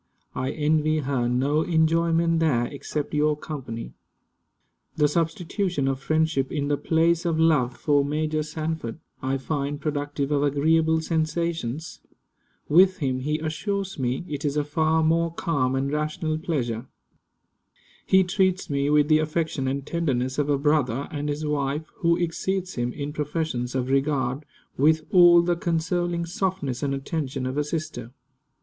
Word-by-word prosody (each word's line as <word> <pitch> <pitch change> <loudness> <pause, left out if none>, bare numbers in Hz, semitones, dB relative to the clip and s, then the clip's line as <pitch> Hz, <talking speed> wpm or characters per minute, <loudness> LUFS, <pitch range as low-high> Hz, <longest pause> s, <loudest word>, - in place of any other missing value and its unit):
I 130 +1 -2
envy 155 +1 +1
her 130 -3 0
no 140 +5 +1
enjoyment 165 0 +2
there, 135 -7 +2
except 145 +2 -5
your 150 0 +2
company. 125 - -6 1.0
The 150 - +3
substitution 170 0 -1
of 135 -1 -1
friendship, 155 -2 0
in 145 -2 -1
the 145 - +3
place 165 +2 +2
of 165 -2 0
love, 145 -7 +3
for 145 -2 +2
Major 155 +2 -1
Sanford, 155 -5 -4 0.2
I 135 +1 0
find 140 +1 -3
productive 145 -1 -2
of 145 -1 +2
agreeable 160 +3 +2
sensations. 160 -3 -2 0.7
With 185 +4 +5
him, 130 -6 -1
he 150 +4 -1
assures 190 +4 -3
me, 130 +6 -1
it 145 -3 -5
is 145 0 -1
a 150 - +2
far 160 +2 +1
more 165 +1 +2
calm 140 -6 0
and 135 +1 -1
rational 155 +1 -1
pleasure. 125 -8 -2 1.2
He 190 0 +4
treats 185 -2 0
me 140 0 +1
with 150 0 +4
the 155 0 +5
affection 155 -3 -1
and 135 +1 -2
tenderness 130 -6 -1
of 145 0 0
a 145 - +3
brother, 140 -3 +1
and 145 0 -3
his 150 +1 -3
wife, 150 +1 -1
who 170 0 +2
exceeds 185 +2 -2
him 120 0 -2
in 145 0 -5
professions 150 -5 -2
of 130 -1 -1
regard, 135 0 0 0.3
with 155 +2 +3
all 175 -2 +7
the 175 0 +1
consoling 170 +1 -1
softness 170 -7 -2
and 140 -1 0
attention 135 -2 -3
of 130 +1 -3
a 150 - +1
sister. 150 -6 -4
150 Hz, 150 wpm, -25 LUFS, 140-165 Hz, 1.2 s, all